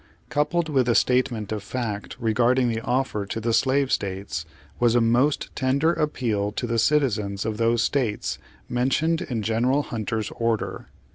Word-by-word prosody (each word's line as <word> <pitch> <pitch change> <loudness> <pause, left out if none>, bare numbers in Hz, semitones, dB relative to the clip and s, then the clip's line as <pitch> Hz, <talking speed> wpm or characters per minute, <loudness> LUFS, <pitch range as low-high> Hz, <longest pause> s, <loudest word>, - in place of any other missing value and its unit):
Coupled 155 +3 +1
with 135 -5 +1
the 120 - +3
statement 120 -4 +1
of 110 -1 -2
fact 105 -1 -4
regarding 120 +2 +2
the 115 0 -2
offer 125 -4 -1
to 105 - -3
the 115 +1 -1
slave 130 +3 +2
states, 95 -4 -2 0.3
was 120 -1 +3
a - - +6
most 120 +6 +1
tender 140 +5 +2
appeal 115 -10 -1
to 120 - -2
the 115 -1 0
citizens 110 -8 +1
of 110 -1 -2
those 115 0 +2
states 125 -7 -1 0.3
mentioned 145 +7 +1
in 120 -11 -3
General 120 +7 +1
Hunter's 110 -2 -3
order. 115 -2 -2
120 Hz, 155 wpm, -24 LUFS, 110-130 Hz, 0.3 s, a